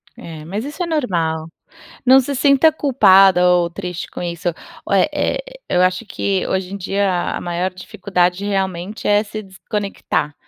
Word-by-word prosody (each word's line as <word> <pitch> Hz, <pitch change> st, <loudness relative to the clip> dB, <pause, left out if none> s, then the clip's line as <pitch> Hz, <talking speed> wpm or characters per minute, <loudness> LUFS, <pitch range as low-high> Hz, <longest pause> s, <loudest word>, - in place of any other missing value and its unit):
É, 160 Hz, -2 st, -10 dB
mas 200 Hz, +7 st, -4 dB
isso 295 Hz, +6 st, -7 dB
é -, -, +1 dB
normal. 170 Hz, -, -1 dB, 0.6 s
Não 265 Hz, +1 st, +7 dB
se 280 Hz, +2 st, -3 dB
sinta 280 Hz, +3 st, +5 dB
culpada 195 Hz, -11 st, +5 dB
ou 175 Hz, -1 st, +3 dB
triste 180 Hz, -1 st, -6 dB
com -, -, -7 dB
isso. 170 Hz, 0 st, -3 dB, 0.4 s
Ó -, -, 0 dB
eh -, -, +4 dB
eh -, -, -1 dB, 0.3 s
eu 180 Hz, -, +2 dB
acho 185 Hz, +5 st, +1 dB
que 195 Hz, -2 st, -1 dB
hoje 190 Hz, 0 st, -2 dB
em -, -, -4 dB
dia 195 Hz, +1 st, -1 dB, 0.3 s
a -, -, -4 dB
maior 175 Hz, +2 st, -2 dB
dificuldade 185 Hz, 0 st, -1 dB
realmente 195 Hz, 0 st, -3 dB
é 205 Hz, 0 st, +4 dB
se 215 Hz, +1 st, -7 dB
desconectar, 195 Hz, -6 st, -3 dB
190 Hz, 165 wpm, -19 LUFS, 180-210 Hz, 0.6 s, Não